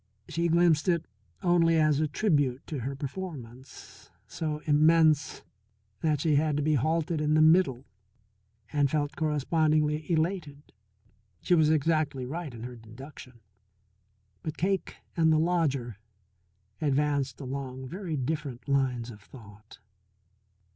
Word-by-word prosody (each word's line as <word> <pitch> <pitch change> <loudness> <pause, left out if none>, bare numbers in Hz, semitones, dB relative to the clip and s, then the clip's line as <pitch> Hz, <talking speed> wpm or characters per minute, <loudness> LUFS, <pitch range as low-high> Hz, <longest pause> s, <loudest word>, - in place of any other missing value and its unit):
She 170 +2 -1
glimpsed 170 -1 +3
it 170 -2 +1 0.4
only 170 -2 +3
as 155 -2 +3
a 155 - +1
tribute 145 - 0
to 150 - -5
her 135 +3 -4
performance, 140 -4 -9 0.2
so 150 -2 -4
immense 155 -1 +3 0.6
that 150 -3 0
she 155 -1 +2
had 150 -1 +1
to 150 - 0
be 155 +1 +2
halted 160 +3 0
in 150 0 +2
the 155 - +5
middle, 155 -6 +3 0.9
and 145 -2 +2
felt 145 0 -1
correspondingly 155 +1 +1
elated. 160 -3 -2 0.7
She - - +2
was 160 -3 +4
exactly 155 -3 +1
right 155 +3 -5
in 115 -1 -9
her 125 0 -7
deduction. 120 +2 -13 1.0
But 155 0 -5
Cake 190 +1 -1 0.2
and 160 -1 +3
the 155 - +4
lodger 145 - 0 0.8
advanced 145 -1 0
along 130 -1 -6
very 175 0 -4
different 140 -2 -4
lines 130 -4 0
of 105 -2 -13
thought. 105 -2 -15
150 Hz, 125 wpm, -28 LUFS, 135-160 Hz, 1.0 s, the